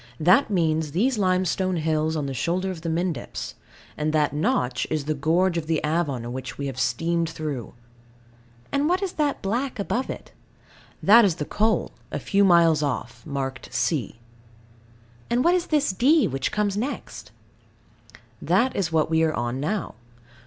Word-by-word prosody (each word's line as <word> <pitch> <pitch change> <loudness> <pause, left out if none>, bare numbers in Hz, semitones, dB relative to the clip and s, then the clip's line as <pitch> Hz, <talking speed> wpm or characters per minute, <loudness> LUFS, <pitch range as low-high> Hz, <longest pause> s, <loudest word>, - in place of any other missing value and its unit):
That 180 - +4
means 160 -5 0
these 230 +6 +1
limestone 185 0 +1
hills 155 0 0
on 150 -2 -2
the 135 - -3
shoulder 180 +8 -1
of 170 -3 -8
the 165 - -3
Mendips; 165 -5 -3 0.4
and 150 0 -1
that 150 -1 +2
notch 125 -4 0
is 155 -3 -2
the 155 - 0
gorge 170 +4 +1
of 155 - -8
the 160 -2 +1
Avon 140 -7 -1
which 130 -1 -6
we 140 - -4
have 135 -2 -5
steamed 170 +2 0
through. 150 -7 -5 1.0
And 285 +2 +1
what 365 +3 +1
is 380 - -2
that 295 -2 -1
black 250 +7 -1
above 235 +5 -2
it? - - -7 0.7
That 230 +4 +8
is 190 -6 +2
the 150 - -4
coal, 220 +6 0 0.2
a - - -2
few 200 0 +1
miles 170 -4 +5
off, 120 -4 -3
marked 135 -2 -4
C. 125 - -1 1.1
And 240 +2 +2
what 345 - +4
is 360 -1 0
this 295 -7 +2
D, 280 - +4
which 135 -1 -2
comes 205 -2 0
next? 250 +7 -5 1.1
That 255 +2 +2
is 175 -4 -1
what 160 -1 +2
we 160 0 +2
are 160 -1 +2
on 120 +2 -2
now. 195 +9 -2
165 Hz, 165 wpm, -24 LUFS, 150-205 Hz, 1.1 s, That